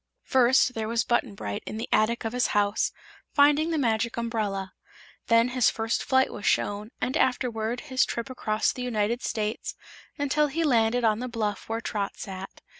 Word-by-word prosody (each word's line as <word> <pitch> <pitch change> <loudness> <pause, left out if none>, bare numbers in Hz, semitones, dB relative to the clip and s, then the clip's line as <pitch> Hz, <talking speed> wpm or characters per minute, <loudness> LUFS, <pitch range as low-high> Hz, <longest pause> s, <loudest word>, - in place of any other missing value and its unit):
First, 255 0 +4
there 220 -2 -3
was 230 0 +1
Button 240 -3 0
Bright 100 - -4
in 215 - -5
the 225 - -4
attic 225 +2 +2
of 225 - -2
his 250 0 +2
house, 205 0 +2 0.4
finding 295 +2 +5
the 325 - 0
Magic 235 -3 0
Umbrella. 210 -5 -2 0.5
Then 230 +1 +4
his 250 -2 +3
first 225 0 -1
flight 260 0 +2
was 205 - -8
shown, 205 +2 0
and 260 - -1
afterward 240 -2 0
his 260 -3 +1
trip 235 +1 -3
across 220 -4 0
the 255 - -7
United 235 -1 -1
States 215 0 -3 0.4
until 285 +1 +2
he 320 +4 -1
landed 240 -4 +2
on 220 -1 +3
the 250 +1 -4
bluff 215 -4 -3
where 225 +1 -2
Trot 205 -3 -3
sat. 190 0 -8
230 Hz, 180 wpm, -27 LUFS, 215-255 Hz, 0.5 s, finding